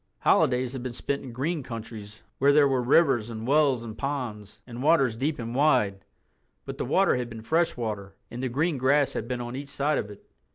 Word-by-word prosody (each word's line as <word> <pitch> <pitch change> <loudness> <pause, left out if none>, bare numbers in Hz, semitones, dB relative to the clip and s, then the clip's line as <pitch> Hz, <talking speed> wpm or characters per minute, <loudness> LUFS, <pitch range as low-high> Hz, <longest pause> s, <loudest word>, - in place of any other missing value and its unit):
Holidays 125 0 +2
had 130 - -5
been 125 -1 -5
spent 140 +3 -3
in 130 - -8
green 150 +7 -2
countries 110 -5 -8 0.2
where 140 +2 +5
there 145 0 +5
were 130 -2 +1
rivers 125 -3 +3
and 110 -1 -6
wells 140 -3 +3
and 110 -2 -7
ponds, 115 -6 -5
and 120 0 -8
waters 135 -6 +3
deep 145 +6 -1
and 115 -1 -5
wide—but 105 - -2
the - - -1
water - - +3
had 125 -1 -3
been 115 -1 -9
fresh 165 +7 +1
water, 105 -5 -4 0.2
and 120 - -6
the 130 - -1
green 145 +4 0
grass 140 +1 +3
had 115 - -4
been 125 -1 -3
on 120 +1 -6
each 140 +1 -6
side 145 +2 0
of 105 - -5
it. 105 - -13
125 Hz, 210 wpm, -26 LUFS, 115-140 Hz, 0.2 s, where